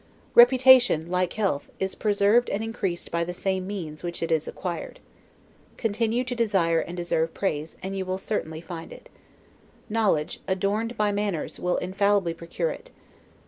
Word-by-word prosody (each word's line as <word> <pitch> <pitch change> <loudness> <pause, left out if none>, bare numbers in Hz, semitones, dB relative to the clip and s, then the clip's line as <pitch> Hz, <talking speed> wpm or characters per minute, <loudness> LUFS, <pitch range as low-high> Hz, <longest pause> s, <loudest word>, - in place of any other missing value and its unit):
Reputation, 245 - +6
like 180 -1 0
health, 195 -10 -1
is 190 0 -2
preserved 210 +3 +2
and 205 +2 -2
increased 195 -6 -3
by 170 0 0
the 175 +1 -5
same 190 0 -1
means 165 -7 -6
by 175 - -4
which 170 -1 -4
it 165 - -2
is 160 -1 +1
acquired. 175 -2 -5 0.8
Continue 225 +2 0
to 255 0 -4
desire 195 -8 +2
and 175 +2 -5
deserve 165 -2 -1
praise, 155 -5 -2
and 195 +1 -4
you 190 - -2
will 185 0 -2
certainly 160 -6 -3
find 165 -1 -8
it. - - -13 0.8
Knowledge, 210 -9 +1
adorned 205 +5 -1
by 210 -1 +2
manners, 205 -5 -2
will 180 0 0
infallibly 195 -1 +1
procure 170 - -3
it. - - -9
190 Hz, 160 wpm, -26 LUFS, 170-215 Hz, 0.8 s, Reputation